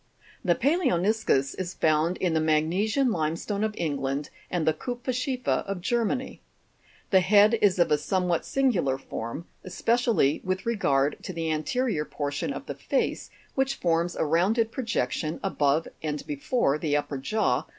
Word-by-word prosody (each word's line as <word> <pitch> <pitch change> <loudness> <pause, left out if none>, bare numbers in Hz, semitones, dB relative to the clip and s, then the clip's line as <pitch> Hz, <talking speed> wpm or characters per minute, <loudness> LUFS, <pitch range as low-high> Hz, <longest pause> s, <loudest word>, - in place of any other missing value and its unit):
The 175 -3 +3
palaoni'scus 220 - +1
is 185 0 -4
found 160 +3 +2
in 180 -3 0
the 160 - +2
magnesian 180 - +2
limestone 170 +5 -1
of 215 -1 -1
England 140 -2 -2 0.2
and 175 -3 -1
the 160 - +3
kupferzchiefer 250 - -2
of 195 -2 -3
Germany. 240 +6 -1 0.7
The 190 - +7
head 205 +4 +5
is 195 -3 +4
of 170 -3 +3
a 150 - +4
somewhat 180 +1 0
singular 200 - +1
form, 115 +4 -6 0.2
espe 185 +5 0
cially 235 - +2
with 185 0 -2
regard 145 -11 +1
to 185 - -6
the 165 -1 -2
ante 155 - -2
rior 205 - 0
portion 145 - -3
of - - -6
the - - -4
face, - - -2 0.2
which 270 0 0
forms 170 0 0
a - - 0
rounded 200 +9 +2
projection 230 - -1
Fig. - - -8
5G.Pal<B<mi 195 - +1
sous - - -8
above 145 +2 +3
and 150 -1 -2
beforc 260 - 0
the 150 -3 +1
upper 145 -1 -3
jaw? 215 +11 0
180 Hz, 165 wpm, -27 LUFS, 155-230 Hz, 0.7 s, The